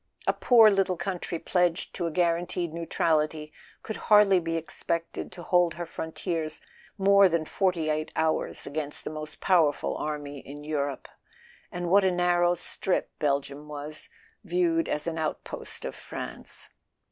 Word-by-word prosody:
A - - +3
poor 225 -4 +6
little 195 -2 +1
country 180 -2 -3
pledged 175 0 0
to 175 - -2
a - - -3
guar 170 0 +3
ranteed 175 -1 -3
neutrality 155 -2 0 0.3
could 220 - -5
hardly 205 -3 +7
be 165 -1 -2
expected 165 +1 -3
to 180 -2 -10
hold 175 -1 +3
her 175 0 -4
frontiers 160 -1 -3 0.4
more 200 0 +6
than 165 -2 0
forty 180 -3 0
eight 155 +1 -2
hours 160 0 0
against 150 0 -1
the - - -5
most 155 0 -7
powerful 165 -6 +2
army 145 -2 -4
in 145 +2 -10
Europe. 145 -3 -3 0.6
And 175 0 -3
what 195 +3 +5
a 190 - +4
nar¬ 175 -1 +2
row 175 0 +4
strip 180 +1 0
Belgium 140 0 -1
was, 150 +1 -5 0.3
viewed 335 -2 +1
as 150 - -1
an 165 -1 -2
outpost 155 - -3
of - - -4
France! - - -6
170 Hz, 155 wpm, -27 LUFS, 155-180 Hz, 0.6 s, hardly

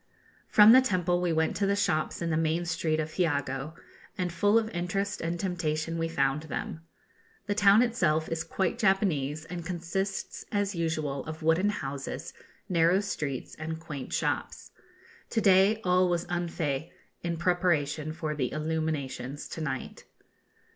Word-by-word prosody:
From 210 0 +8
the 260 +2 +9
temple 180 -6 +1
we 175 -1 +1
went 160 0 +1
to 200 - +1
the 200 - +2
shops 175 -5 0
in 165 - -1
the - - +1
main 165 +2 +1
street 165 -2 0
of 155 0 -2
Hiogo, 145 -3 -1 0.4
and 180 -2 -2
full 205 +5 +3
of 225 -1 +2
interest 190 +3 -2
and 170 +1 -2
temptation 165 -3 -2
we 165 - 0
found 140 -2 +1
them. 160 +1 -5 0.6
The 205 - 0
town 205 +2 +6
itself 160 -10 +1
is 165 0 -2
quite 175 +2 -1
Japanese, 165 -7 +1
and 170 0 -6
consists, 180 +3 -3
as 205 -1 0
usual, 155 -5 -2
of 160 0 -7
wooden 165 +6 +3
houses, 140 -8 -5 0.3
narrow 170 +1 +3
streets, 150 -10 -4
and 160 +1 -5
quaint 150 -5 -7
shops. - - -2 0.6
To 225 - 0
day 195 +2 +5
all 180 0 +3
was 175 -1 0
en 175 -1 -1
fête, 155 -1 -2 0.3
in 170 -1 -2
preparation 160 -4 +1
for 155 -1 -3
the 130 -5 -2
illuminations 155 -3 -3
to 160 - -6
night. 135 -4 -4
165 Hz, 155 wpm, -29 LUFS, 155-185 Hz, 0.6 s, the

